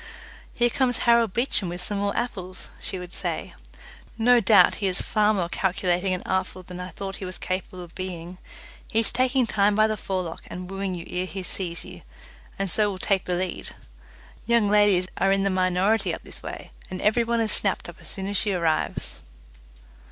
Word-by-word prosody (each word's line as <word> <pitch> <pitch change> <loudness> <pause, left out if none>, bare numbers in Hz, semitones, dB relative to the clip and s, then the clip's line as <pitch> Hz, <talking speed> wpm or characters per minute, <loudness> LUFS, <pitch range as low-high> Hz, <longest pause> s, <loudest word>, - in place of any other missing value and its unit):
"Here 240 0 +3
comes 250 -2 +1
Harry 235 -1 +5
Beecham 220 -3 0
with 175 +1 -5
some 200 +3 -2
more 200 0 -1
apples," 185 -6 -3
she 190 - -3
would 180 -1 -8
say. - - -3 0.6
"No 240 +2 +5
doubt 200 -3 +6
he 200 - +2
is 185 0 +1
far 215 -1 +2
more 185 -5 0
calculating 185 0 0
and 185 0 -2
artful 185 0 -2
than 180 0 -9
I 180 0 -5
thought 195 -1 -6
he 195 - -6
was 185 -1 -6
capable 185 0 -4
of 170 -1 -13
being. 180 -1 -6 0.5
He - - -2
is 225 - +1
taking 255 0 +2
time 205 -2 +2
by 215 +1 +5
the 215 0 0
forelock 185 -4 -4
and 180 +1 -7
wooing 195 -1 -3
you 170 - -7
ere 180 +1 -2
he 190 0 -5
sees 175 -1 -4
you, - - -11 0.6
and 195 - -1
so 210 +3 +3
will 195 - -4
take 190 0 +1
the 180 - 0
lead. 185 0 -3 0.7
Young 235 -3 +4
ladies 205 -3 +4
are 195 - +3
in 195 0 +2
the 195 - +1
minority 185 +4 +2
up - - -13
this - - -9
way, - - -8 0.2
and 185 - -5
every 220 +3 +3
one 235 0 0
is 225 -1 +2
snapped 195 -2 +3
up 175 0 -10
as - - -8
soon 190 - -1
as 200 0 -1
she 205 0 +3
arrives." 165 -3 -1
195 Hz, 205 wpm, -25 LUFS, 180-215 Hz, 0.7 s, doubt